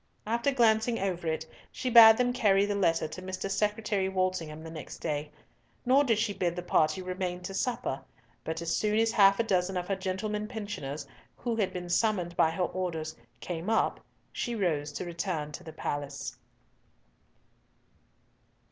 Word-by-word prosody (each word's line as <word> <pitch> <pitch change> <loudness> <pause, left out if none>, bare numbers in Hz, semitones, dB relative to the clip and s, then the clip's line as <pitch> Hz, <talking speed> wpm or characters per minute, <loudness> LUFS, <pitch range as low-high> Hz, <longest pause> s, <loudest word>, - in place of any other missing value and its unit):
After 235 +5 +1
glancing 230 -2 +3
over 180 -3 -2
it, 160 0 -1 0.3
she - - -5
bade 225 -2 +10
them 245 0 +2
carry 200 -5 +3
the 205 - -1
letter 165 -5 +2
to 160 +4 -8
Mr. 185 +1 -4
Secretary 210 -1 0
Walsingham 185 -5 -2
the 160 - -8
next 155 -3 -8
day; 150 0 -3 0.6
nor 265 +3 +5
did 230 -6 +2
she 215 -1 0
bid 175 -3 -1
the 180 - -4
party 155 +1 +2
remain 180 -1 -3
to 195 - -5
supper; 195 - -2 0.4
but 160 +1 -4
as 170 - 0
soon 210 0 +1
as 225 0 +3
half 195 -2 +5
a - - +4
dozen 190 -3 0
of 180 0 -3
her 195 - 0
gentlemen 200 +3 -3
pensioners, 205 - -5 0.3
who 235 -2 -2
had 210 -4 0
been 180 -1 -5
summoned 175 -2 +1
by 160 - +4
her 165 +3 -1
orders, 165 -4 -3 0.3
came 175 +2 -4
up, 225 - +2 0.3
she 240 -2 -2
rose 155 -8 0
to 180 - -4
return 170 -3 -3
to - - -8
the 160 - -8
palace. 145 -2 -4
185 Hz, 170 wpm, -29 LUFS, 165-215 Hz, 0.6 s, bade